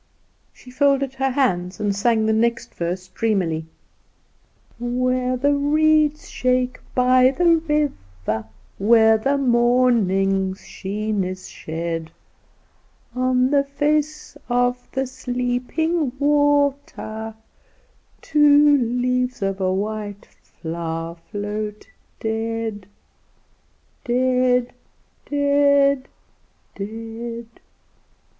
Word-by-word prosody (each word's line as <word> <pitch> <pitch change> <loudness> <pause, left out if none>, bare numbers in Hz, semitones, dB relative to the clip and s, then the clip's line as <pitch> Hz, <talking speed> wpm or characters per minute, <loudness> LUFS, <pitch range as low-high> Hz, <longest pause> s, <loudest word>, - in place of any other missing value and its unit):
She 250 - -16
folded 275 0 +2
her 270 0 0
hands 185 -10 0
and 205 -2 0
sang 220 +1 +2
the 220 - +2
next 235 +1 0
verse 180 +2 -4
dreamily: 180 -7 -1 1.1
Where 255 +1 0
the 285 +3 +2
reeds 305 +1 +2
shake 255 0 0 0.2
by 255 0 +5
the 335 +4 +3
river, 110 - -2 0.3
Where 220 +1 +5
the 275 +5 +1
moonlight's 230 -7 +2
sheen 210 +1 -3
is 185 0 -6
shed, 165 0 -5 1.1
On 255 +1 +2
the 280 -1 +4
face 300 +2 -1
of 245 0 0
the 265 0 -1
sleeping 255 +4 -2
water, 285 -6 0 0.9
Two 295 0 +5
leaves 250 -1 0
of 195 0 -2
a 185 0 +1
white 205 +1 -4 0.2
flower 165 0 -5 0.2
float 210 +1 -4 0.3
dead. 225 -2 -3 1.2
Dead, 250 0 +1 0.6
Dead, 280 -1 +3 0.7
Dead! 225 +3 -6
245 Hz, 85 wpm, -22 LUFS, 205-275 Hz, 1.2 s, by